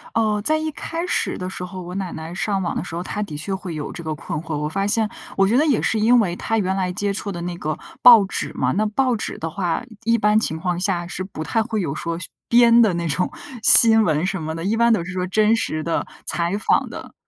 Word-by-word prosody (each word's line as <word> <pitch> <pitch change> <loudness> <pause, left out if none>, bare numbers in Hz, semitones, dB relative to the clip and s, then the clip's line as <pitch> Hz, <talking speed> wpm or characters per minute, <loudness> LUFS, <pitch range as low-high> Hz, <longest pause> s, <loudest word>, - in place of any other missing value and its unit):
哦， 215 -2 +1
在 310 +7 +3
一 315 0 -3
开 330 +3 -5
始 360 - -1
的 185 0 -5
时 180 - -6
候， 185 +1 -7
我 180 0 -8
奶 190 -3 -4
奶 160 +1 -7
上 195 +1 -1
网 170 - -3
的 - - -2
时 165 - -7
候， 170 - -4
她 205 - -4
的 155 -8 -5
确 160 +6 -4
会 190 -3 -5
有 150 -1 -5
这 170 - -8
个 155 -1 -3
困 150 -1 -5
惑。 160 -2 -4
我 150 +1 -2
发 195 +5 -2
现， 220 0 +2 0.3
我 195 0 +4
觉 225 - +1
得 300 - +3
也 280 -7 +2
是 220 - 0
因 240 +3 +4
为 180 -6 0
她 225 - -2
原 190 -3 0
来 185 -2 -1
接 200 +2 -2
触 200 0 -4
的 175 -2 -6
那 175 0 -4
个 155 -2 -3 0.2
报 235 -4 +9
纸 195 - -4
嘛， - - 0
那 215 +3 0
报 255 +3 0
纸 215 - -4
的 165 - -4
话， 175 +4 -2 0.2
一 230 0 +2
般 210 0 +3
情 160 -7 -2
况 175 +1 -2
下， 180 -2 -1
是 185 +1 -4
不 185 -5 -7
太 225 +7 0
会 220 -1 -3
有 150 -6 -3
说 165 +2 -4 0.3
编 235 0 +6
的 215 -5 +3
那 170 0 -2
种 180 - 0 0.3
新 225 0 +8
闻 160 -2 0
什 195 -2 -3
么 160 0 -4
的， 165 - -6
一 210 +3 +1
般 235 0 +4
都 180 - 0
是 180 - -7
说 185 0 -2
真 215 +4 +3
实 155 -8 -2
的、 170 - -2 0.2
采 170 +3 -1
访 210 - +1
的。 - - -10
190 Hz, 285 characters per minute, -21 LUFS, 170-220 Hz, 0.3 s, 报